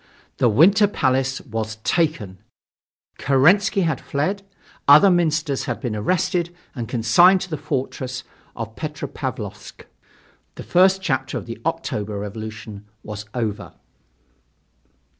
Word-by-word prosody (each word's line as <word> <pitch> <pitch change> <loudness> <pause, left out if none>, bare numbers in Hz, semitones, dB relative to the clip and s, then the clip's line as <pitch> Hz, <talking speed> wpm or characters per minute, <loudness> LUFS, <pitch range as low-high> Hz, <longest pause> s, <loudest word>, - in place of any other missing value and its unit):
The 120 - +3
Winter 195 - +5
Palace 130 -7 0
was 110 -3 -4
taken; 135 - -1 0.8
Kerensky 180 +10 +3
had 160 -2 -1
fled; 185 +9 -2 0.5
other 150 +8 +8
ministers 155 -5 0
had - - -3
been 120 -5 -3
arrested 175 - 0 0.2
and 120 -5 -6
consigned 175 - +5
to 180 - -6
the - - -1
fortress 130 -2 -4 0.3
of 115 -1 -6
Petropavlovsk. 125 -9 -6 0.7
The - - -8
first 190 +1 +3
chapter 135 -8 -1
of - - -6
the - - -8
October 105 0 -3
revolution 105 0 -7 0.2
was 105 0 -7
over. 110 -4 -3
135 Hz, 115 wpm, -22 LUFS, 110-170 Hz, 0.8 s, other